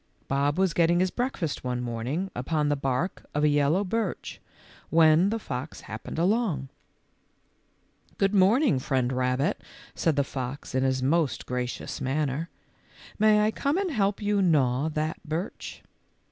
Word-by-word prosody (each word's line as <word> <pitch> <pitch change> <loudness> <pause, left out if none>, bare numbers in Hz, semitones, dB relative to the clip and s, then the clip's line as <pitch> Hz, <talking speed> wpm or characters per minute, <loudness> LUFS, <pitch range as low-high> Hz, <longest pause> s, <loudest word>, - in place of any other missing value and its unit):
Bob 140 +2 +1
was 190 -3 +2
getting 170 +1 +3
his 185 0 +1
breakfast 240 - -2
one 125 -1 -2
morning 125 +10 -3
upon 150 +4 0
the 145 - +2
bark 135 +6 -2
of 150 - +1
a - - +5
yellow 145 +6 +2
birch 210 0 -3 0.5
when 160 +3 +5
the 225 - -1
fox 135 - -6
happened 110 +6 -7
along. 175 - +1 0.7
" - - -38
Good 195 +1 +2
morning, 205 - +4
Friend 130 -1 0
Rabbit," 125 +3 0 0.3
said 165 -3 +1
the 140 - +2
fox 130 +1 -6
in 130 - +1
his 130 -1 +1
most 145 -3 +1
gracious 125 -1 -4
manner; 145 +3 -1 0.4
" - - -21
may 210 0 +5
I 215 - +2
come 280 - 0
and 385 -3 -1
help 205 -4 0
you 205 -1 +2
gnaw 145 -5 +2
that 155 0 -2
birch 165 +4 -5
155 Hz, 155 wpm, -27 LUFS, 130-195 Hz, 0.7 s, a